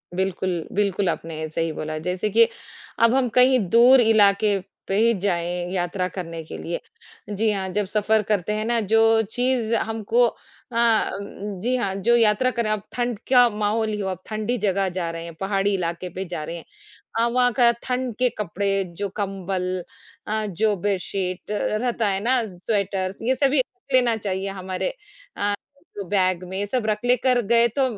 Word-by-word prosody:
बिल्कुल, 185 -2 -1
बिल्कुल 200 -2 +1
आपने 160 -1 -4
सही 165 +1 -1
बोला। 155 0 -4
जैसे 180 +5 -2
कि 230 +2 +5 0.6
अब 230 +1 +5
हम 265 -2 +2
कहीं 255 0 +6
दूर 245 +4 +7
इलाके 205 -2 +4 0.3
पे 195 - 0
ही 230 +1 +4
जाएँ, 175 -1 -1
यात्रा 180 0 -1
करने 165 -3 -6
के - - -8
लिए। 170 - -4 0.5
जी 215 +2 0
हाँ, 190 -2 -2
जब 205 +1 -1
सफ़र 215 +2 +1
करते 210 0 +1
हैं 215 +1 -2
ना 235 0 +1
जो 225 0 +5
चीज़ 245 -2 0
हमको 225 +2 +1 0.4
अ, - - -8 0.9
जी 250 +3 +1
हाँ, 200 -5 -1
जो 235 +5 +3
यात्रा 225 +3 +3
कर 235 -1 -1
रहे 215 - -1
हैं 215 - +1
अब - - -20
ठंड 240 -3 -2
क्या 245 -2 +6
माहौल 215 +1 0
ही 210 -1 -3
हो, 195 - -2
अब 185 0 -5
ठंडी 215 +3 -2
जगह 195 -1 +1
जा 170 -2 -1
रहे 165 0 -6
हैं, 170 -1 -8
पहाड़ी 195 +1 0
इलाके 175 0 -2
पे 190 +1 -3
जा 170 -3 -5
रहे 165 +2 -5
हैं। 170 - -9 0.5
अ, 230 - +4
वहाँ 245 +1 +2
का 235 -1 +7
ठंड 250 -3 -2
के 250 -1 +3
कपड़े 195 0 -1
जो 200 -1 -2
कंबल 185 -2 -3 0.4
अ, 215 0 -1
जो 210 +2 0
बेशीत 190 0 -3
रहता 220 +1 0
है 195 -1 0
ना 250 0 +2
स्वेटर्स 195 -1 -2
ये 255 +3 +1
सभी 275 0 +3 0.3
लेना 245 -3 +4
चाहिए 195 -1 -3
हमारे 190 - -3 0.4
अ, 205 0 0 0.4
तो 200 - -3
बैग 185 -3 +1
में 195 +2 -2
सब 245 0 -1
रख 215 -1 0
लेकर 250 0 +3
गए 235 0 +6
तो 270 - +4
205 Hz, 180 wpm, -23 LUFS, 185-230 Hz, 0.9 s, दूर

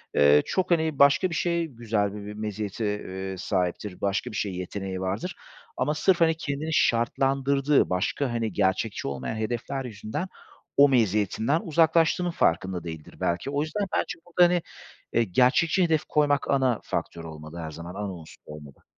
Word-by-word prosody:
eee, 75 0 +6
çok 185 -1 -1
hani 160 -4 +1
başka 140 +6 +5
bir 165 - -4
şey, 170 +1 0
güzel 110 -6 -1
bi 105 -1 -7
bir 105 - -6
meziyete, 105 0 -4 0.2
eee, 95 0 -5
sahiptir, 90 0 -2
başka 100 +5 -1
bir - - -8
şeye 100 -3 -2
yeteneği 95 +1 -5
vardır 100 - -3 0.4
ama 150 - +1
sırf, 175 +3 +2
hani, 165 -1 +4
kendini 155 0 -3
şartlandırdığı 135 +3 +2
başka, 95 +9 -1
hani, 115 -2 -1
gerçekçi 100 +2 0
olmayan 70 +4 -4
hedefler 120 +5 -3
yüzünden 115 - -5 0.5
o 145 0 +8
meziyetinden 110 - +2
uzaklaştığının 165 +2 +3
farkında 90 - 0
değildir 80 -3 -8
belki. 85 +9 -1
O 145 0 0
yüzden 160 +7 -2
bence - - -2
burada, 175 +1 +3
hani, 175 -1 +1 0.5
eee, 115 - +4
gerçekçi 130 - +3
hedef 160 -3 +1
koymak 145 -2 +1
ana 130 -4 +2
faktör 85 - -4
olmalı 80 +1 -9
her 80 -2 -5
zaman, 85 +3 -8
ana 100 -1 -4
unsur 80 -3 -12
olmalı. 75 -3 -12
115 Hz, 160 wpm, -26 LUFS, 95-150 Hz, 0.5 s, o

